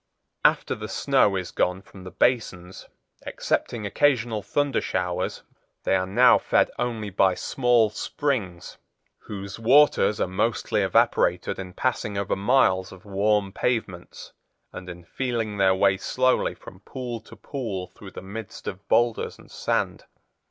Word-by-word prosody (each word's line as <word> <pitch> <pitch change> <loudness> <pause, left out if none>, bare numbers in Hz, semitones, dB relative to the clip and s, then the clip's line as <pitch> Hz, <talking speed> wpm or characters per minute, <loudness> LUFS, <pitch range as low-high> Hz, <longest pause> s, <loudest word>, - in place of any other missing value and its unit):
After - - +3
the - - -6
snow 100 -2 +2
is 90 -2 -3
gone 90 +2 0
from 95 -2 -14
the - - -6
basins, 95 -7 -1 0.4
excepting 110 -3 -2
occasional 120 -2 +1
thundershowers, 100 -7 -1 0.4
they - - +1
are 95 0 0
now 95 - +5
fed - - +2
only 110 -4 -2
by 95 0 +3
small 120 -4 +2
springs 110 - -3 0.5
whose 100 +1 -7
waters 120 -3 +4
are - - +2
mostly 105 +5 0
evaporated - - +2
in 90 -1 -7
passing 105 -4 -2
over 100 -1 -1
miles 95 -4 +2
of 95 0 -14
warm 100 0 +1
pavements, 105 -9 -3 0.4
and 90 0 -8
in 85 0 -9
feeling 115 0 -3
their 95 -1 +4
way 95 0 +3
slowly 130 +6 +1
from - - -13
pool 125 -3 -6
to 115 - -15
pool 110 -10 -5
through - - -11
the - - -10
midst 100 +2 -8
of 95 +1 -6
boulders 120 -1 +1
and - - -18
sand. - - -2
105 Hz, 140 wpm, -25 LUFS, 95-120 Hz, 0.5 s, now